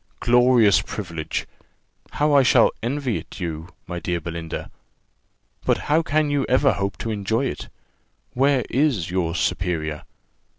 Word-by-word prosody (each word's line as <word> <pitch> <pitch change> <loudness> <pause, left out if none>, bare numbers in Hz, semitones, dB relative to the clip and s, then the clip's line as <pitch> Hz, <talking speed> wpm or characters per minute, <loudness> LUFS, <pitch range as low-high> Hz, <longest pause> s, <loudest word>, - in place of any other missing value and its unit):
Glorious 120 -3 +4
privilege! 85 -6 -5 0.7
How 150 0 +1
I 140 - +7
shall 125 -2 +5
envy 130 0 -1
it - - -10
you, 80 -2 -4 0.2
my 90 0 -5
dear 85 +1 -2
Belinda! 85 0 -6 0.9
But - - +2 0.2
how 160 - +5
can 155 -1 0
you 145 -1 +1
ever 135 +2 +4
hope 100 0 -3
to 115 - -2
enjoy 110 +5 -1
it? - - -5 0.6
Where 135 0 +2
is 125 - +1
your 90 -3 -1
superior? 80 -5 -2
110 Hz, 135 wpm, -23 LUFS, 85-135 Hz, 0.9 s, I